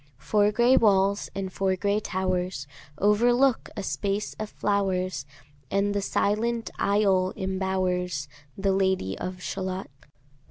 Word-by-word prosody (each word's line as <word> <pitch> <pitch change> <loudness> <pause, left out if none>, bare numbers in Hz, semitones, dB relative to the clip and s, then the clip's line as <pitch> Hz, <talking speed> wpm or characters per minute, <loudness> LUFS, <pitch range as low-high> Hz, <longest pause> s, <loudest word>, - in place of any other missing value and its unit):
Four 205 +8 +2
gray 240 +4 +4
walls, 200 -1 +3
and 190 -1 -4
four 190 -1 +1
gray 200 +2 +1
towers, 185 -6 -2 0.3
Overlook 240 - +3
a 200 - -3
space 200 +1 -2
of 215 -1 -4
flowers, 185 -9 -1 0.4
And 200 +1 +1
the 200 - 0
silent 225 +4 0
isle 195 -2 +2
imbowers 185 -4 -1 0.3
The 195 0 +1
Lady 190 - +1
of 180 0 -5
Shalott. 185 -3 -4
195 Hz, 120 wpm, -26 LUFS, 185-205 Hz, 0.4 s, gray